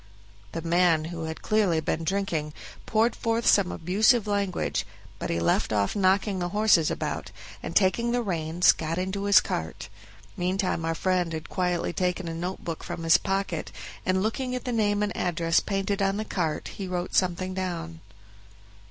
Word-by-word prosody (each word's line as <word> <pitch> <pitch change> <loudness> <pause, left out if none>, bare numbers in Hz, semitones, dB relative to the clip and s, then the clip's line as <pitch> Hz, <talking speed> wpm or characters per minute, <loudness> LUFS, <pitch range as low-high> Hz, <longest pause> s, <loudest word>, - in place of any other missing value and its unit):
The 165 - -4
man, 170 -2 +3
who 165 -1 -4
had 160 0 -6
clearly 205 -7 +2
been 160 +1 -2
drinking, 170 -5 -1 0.3
poured 225 +2 +2
forth 230 0 -1
some 195 -3 +4
abusive 215 +7 +3
language, 200 -3 -1 0.4
but - - -4
he 85 - 0
left 85 - +1
off 100 -2 +1
knocking 195 0 +2
the 175 0 -2
horses 205 -5 +4
about, - - -3 0.3
and 165 - -6
taking 210 +5 +3
the 245 0 +1
reins, 170 -3 +3
got 165 +1 -3
into 190 +2 -2
his 200 0 +7
cart; - - -4 0.5
meantime 185 -2 -1
our 165 0 -1
friend 180 -2 0
had 160 -1 -6
quietly 180 -2 -1
taken 180 0 -1
a 165 - -3
note 175 +3 -4
book 165 -2 -4
from 175 -1 -5
his 165 0 +5
pocket, 195 0 -2 0.3
and 185 +1 +1
looking 250 +4 -2
at 250 - -5
the 250 - -1
name 210 -3 +1
and 205 - -2
address 165 -1 +1
painted 195 0 -2
on 195 0 +1
the 215 - -3
cart, 165 -7 -2
he 195 - -6
wrote 180 0 -3
something 185 0 +1
down. 170 -3 -4
185 Hz, 175 wpm, -26 LUFS, 165-200 Hz, 0.5 s, his